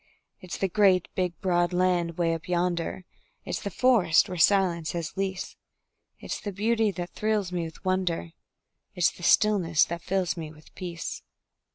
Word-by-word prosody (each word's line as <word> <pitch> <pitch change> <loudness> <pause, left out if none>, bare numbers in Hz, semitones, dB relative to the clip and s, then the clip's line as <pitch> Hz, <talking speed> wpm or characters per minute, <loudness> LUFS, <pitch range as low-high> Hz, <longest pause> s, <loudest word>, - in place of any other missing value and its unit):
It's 180 -3 -7
the 195 - 0
great, 190 -2 +3
big, 180 -2 -2
broad 175 -1 +1
land 175 -2 +1
'way 170 -1 +1
up 165 +1 -6
yonder, 175 0 -1 0.4
It's - - -3
the 200 - -3
forests 200 -6 +4
where 180 - -5
silence 170 -3 +2
has 170 -2 -4
lease; 190 -1 -3 0.6
It's - - -5
the 205 - -4
beauty 220 +2 +1
that 180 -2 -5
thrills 210 -4 -1
me 175 -2 -2
with 160 +2 -11
wonder, 180 - -1 0.6
It's 175 -2 +3
the - - -15
stillness 175 -4 +4
that 170 0 -5
fills 185 -1 -1
me 160 -3 -6
with 155 0 -18
peace. 175 -3 -6
180 Hz, 165 wpm, -27 LUFS, 170-195 Hz, 0.6 s, forests